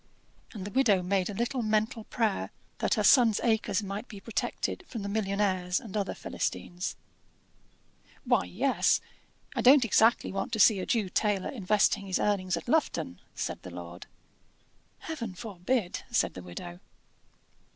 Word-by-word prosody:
And 200 -5 -6
the 205 - -6
widow 215 -7 +3
made 190 +1 0
a - - -4
little 240 +4 -1
mental 220 +1 0
prayer 220 -4 -1 0.3
that - - +1
her - - 0
son's 235 -6 +6
acres 220 -3 +1
might 200 +4 -5
be 205 - -9
protected 230 - -3
from 225 -4 -6
the - - -3
millionnaires 195 -3 0
and 220 -5 -10
other 200 -2 -1
Philistines. 175 +1 -3 1.3
"Why, - - +3
yes: - - +2 0.6
I - - 0
don't 260 0 +7
exactly 225 +2 +3
want 195 - -3
to 220 - -1
see 205 -1 +6
a 185 - -4
Jew 220 -5 +1
tailor 200 0 0
investing 205 -2 +1
his 185 - 0
earnings 185 -4 0
at 170 - -8
Lufton," 240 - 0 0.2
said - - -4
the - - -9
lord. 85 0 -9 0.9
"Heaven 235 -12 -5
forbid!" 200 +2 -2
said 240 - +1
the 90 - -8
widow. 85 0 -8
205 Hz, 150 wpm, -29 LUFS, 185-230 Hz, 1.3 s, don't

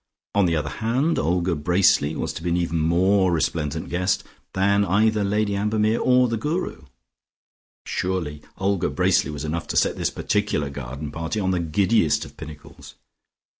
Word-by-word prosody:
On 100 -2 +3
the 85 - +1
other 75 -2 -2
hand 130 +9 +1
Olga 85 +3 +1
Bracely 80 -2 +2
was - - -3
to - - -7
be 90 - -2
an 85 - +1
even 85 -1 -1
more 90 +4 +3
resplendent 80 -1 -1
guest 90 +2 0 0.3
than 100 +1 +2
either 105 +2 +2
Lady 100 0 0
Ambermere 105 +2 +1
or 125 0 +4
the 115 -1 -1
Guru; 150 - -3 1.0
surely 85 -5 -3 0.2
Olga 95 -1 0
Bracely - - +2
was 75 0 -5
enough 80 +2 -3
to - - -2
set - - +2
this - - 0
particular 105 -9 -1
garden 70 +2 -6
party 80 +6 -3
on 95 -2 0
the 90 - 0
giddiest 85 +2 +1
of - - -14
pinnacles. 75 -1 -11
90 Hz, 165 wpm, -23 LUFS, 80-105 Hz, 1.0 s, or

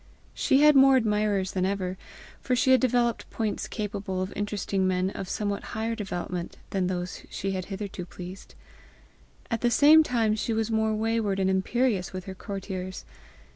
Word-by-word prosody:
She 270 - +3
had 300 -1 +7
more 270 0 +7
admirers 210 -4 +1
than 185 - -1
ever, 190 -1 -1 0.4
for 255 - 0
she 260 +1 +3
had 260 - +6
developed 240 -2 +1
points 215 -3 -2
capable 200 -3 -3
of 185 - -6
interesting 200 -2 -1
men 185 0 0
of 190 - -6
somewhat 205 -1 -2 0.2
higher 225 +1 -1
development 180 -4 -4
than 190 -2 0
those 180 -1 -4
she 195 - -3
had 185 -1 -3
hitherto 195 -2 -6
pleased. 180 +2 -10 1.0
At 230 - -1
the 240 - +3
same 295 +6 +7
time 230 -7 +1
she 220 +2 -1
was 225 0 -1
more 220 0 +1
wayward 220 -2 0
and 190 0 +2
imperious 190 0 0
with 185 -1 -6
her 190 - -6
courtiers. 190 -1 -6
205 Hz, 170 wpm, -27 LUFS, 185-230 Hz, 1.0 s, had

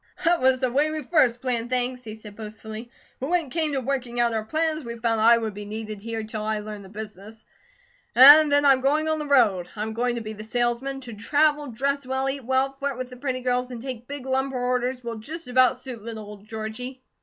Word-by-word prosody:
"That 340 -2 +3
was 260 0 +4
the 255 -1 0
way 290 +4 +2
we 310 -1 -4
first 255 -5 +2
planned 240 -3 -1
things," 250 0 -1
he 215 -2 -7
said 215 -2 -12
boastfully, 220 +1 -8 0.3
"but 270 - -3
when 350 -2 +2
it 260 - -14
came 315 -1 0
to 270 - 0
working 250 -2 -2
out 235 -1 +3
our 220 -1 -1
plans, 315 +5 -1
we 235 -1 -6
found 225 -1 0
I 230 +1 +7
would 220 -2 -3
be 205 +1 -7
needed 215 0 -6
here 225 0 -4
till 215 0 -5
I 215 0 0
learned 210 -1 -7
the 190 - -13
business, 215 +1 -9 0.7
and 290 +4 +9
then 285 0 +4
I'm 270 -2 +5
going 300 +4 +2
on 315 0 0
the 300 - -4
road. 210 -11 +3
I 210 - -3
am 220 0 -4
going 240 +1 0
to 235 - -3
be 215 0 -6
the 215 0 -9
salesman. 240 +4 -1
To 240 -3 -8
travel, 295 +6 +1
dress 280 +4 -1
well, 265 +1 -1
eat 270 0 -3
well, 260 +2 +1
flirt 275 -1 -4
with 255 0 -5
the 250 - -10
pretty 255 -1 -3
girls, 250 0 0
and 245 -2 -7
take 245 -1 -7
big 285 -2 -7
lumber 265 0 -1
orders 250 0 -1
will 235 -1 -5
just 320 +8 -7
about 255 0 +4
suit 255 -3 -8
little 220 0 -7
old 205 0 -12
Georgie." 225 +4 -6
250 Hz, 240 wpm, -25 LUFS, 220-270 Hz, 0.7 s, and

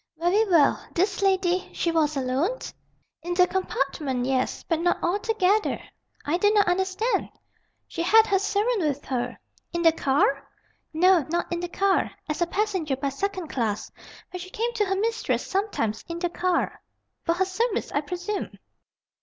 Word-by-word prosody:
"Very 385 +6 +2
well. 325 -6 +4
This 390 +3 +1
lady 375 -2 +1
she 335 - 0
was 310 -3 +1
alone?" 270 - 0 0.6
"In 350 +2 -3
the 360 0 +6
compartment, 275 -8 -2
yes. 260 -1 -1
But 330 -2 -1
not 350 +1 +2
altogether." 415 +2 +1 0.5
"I 305 +4 +1
do 410 +3 +4
not 415 -1 +3
understand!" 380 +6 0 0.6
"She 335 - -4
had 440 +6 +6
her 400 -3 +2
servant 420 +3 +1
with 290 -3 -1
her." 245 -1 -2 0.4
"In 340 0 -1
the 330 - +7
car?" 275 -2 +1 0.4
"No, 355 +1 +4
not 345 +1 -1
in 340 - -1
the 350 0 -4
car. 390 +2 +1 0.2
As 305 +2 -3
a 345 - +3
passenger 375 -7 -1
by 275 +1 -2
second 370 +3 -3
class. 220 -5 -2 0.4
But 365 - -6
she 370 - -8
came 465 +5 -2
to 430 -3 +1
her 385 0 0
mistress 450 +3 -1
sometimes, 380 - -1
in 335 - -4
the 350 0 -1
car." 350 0 -1 0.4
"For 335 - +1
her 380 +2 +2
service, 420 +4 -1
I 290 - +1
presume?" 360 +6 -4
355 Hz, 165 wpm, -25 LUFS, 310-400 Hz, 0.6 s, the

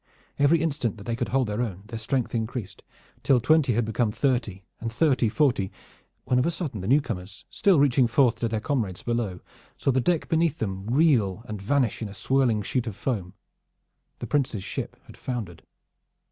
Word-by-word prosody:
Every 145 +4 +5
instant 135 -9 -1
that 100 - -10
they 115 +2 -2
could - - -2
hold 135 0 +2
their 105 +3 -2
own 100 -5 -4
their 115 +1 -6
strength 125 +2 -1
increased, 110 -3 -4 0.4
till 130 -3 +4
twenty 140 +1 +3
had 120 +1 +1
become 110 0 0
thirty 115 -7 -1 0.2
and 115 0 -4
thirty 130 -3 +2
forty, 120 -7 +1 0.5
when 125 - +2
of 125 - +2
a - - +3
sudden 150 - -4
the 95 - -4
newcomers, 105 -8 -1
still 195 -8 +3
reaching 135 -3 +4
forth 120 0 +3
to 115 - -1
their 110 -1 -1
comrades 110 -9 -2
below, 115 -6 -2 0.4
saw 135 - +1
the 130 0 +2
deck 170 +4 +1
beneath 165 -2 +1
them 95 -2 -4
reel 120 - +2
and 105 -2 -6
vanish 125 +1 +1
in 110 - -3
a 100 - -10
swirling 120 0 +1
sheet 125 +3 -1
of 105 - -4
foam. 100 -5 -3 0.8
The - - -5
Prince's 130 -9 0
ship - - -5
had - - -14
foundered. 105 -10 -5
120 Hz, 190 wpm, -26 LUFS, 105-135 Hz, 0.8 s, Every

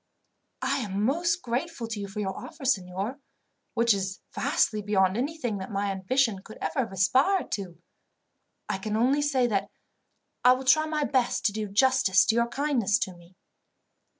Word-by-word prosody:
"I 275 +2 +1
am 205 -4 -2
most 340 +6 +1
grateful 245 +1 -3
to 220 -2 -4
you 200 - -4
for 200 +2 -5
your 190 -2 -3
offer, 310 -4 -9
signor, 200 +1 -1 0.6
which 235 -1 +4
is 195 0 -3
vastly 215 -1 +1
beyond 190 -2 +2
anything 250 -4 -2
that 190 - -6
my 200 -1 -1
ambition 195 +2 0
could 220 - -12
ever 300 - -2
have 230 -6 -1
aspired 260 - +2
to. 185 -4 -4 0.9
I 190 - -2
can 215 +2 -2
only 265 +6 +3
say 280 -4 +2
that 205 -5 0 0.7
I 250 - +7
will 260 +1 -4
try 310 +4 +4
my 305 -1 -1
best 260 -4 0
to 210 - +4
do 215 0 -3
justice 210 -2 +4
to 225 - +2
your 235 0 +2
kindness 245 -5 +1
to 215 -8 -3
me." 175 +1 -19
230 Hz, 175 wpm, -27 LUFS, 195-270 Hz, 0.9 s, I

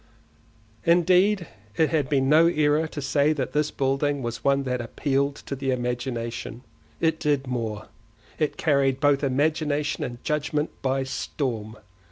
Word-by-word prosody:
Indeed 180 +3 +4 0.3
it 160 - +3
had 150 -5 +1
been 135 -2 +2
no 155 +4 +6
error 155 -1 +2
to 150 - -6
say 145 +2 +2
that 135 -4 -3
this 150 0 +1
building 135 +1 0
was 120 -1 -4
one 140 0 +2
that 125 -2 -2
appealed 140 +3 -1
to 140 - -4
the 135 0 -3
imagination; 120 -2 -3 0.4
it 160 -1 +1
did 145 -2 +1
more—it 115 +2 -5
carried 140 -3 +2
both 145 0 +3
imagination 150 +2 0
and 120 -3 -6
judgement 150 0 -1
by 135 0 0
storm. 115 -5 -4
140 Hz, 140 wpm, -25 LUFS, 125-150 Hz, 0.4 s, no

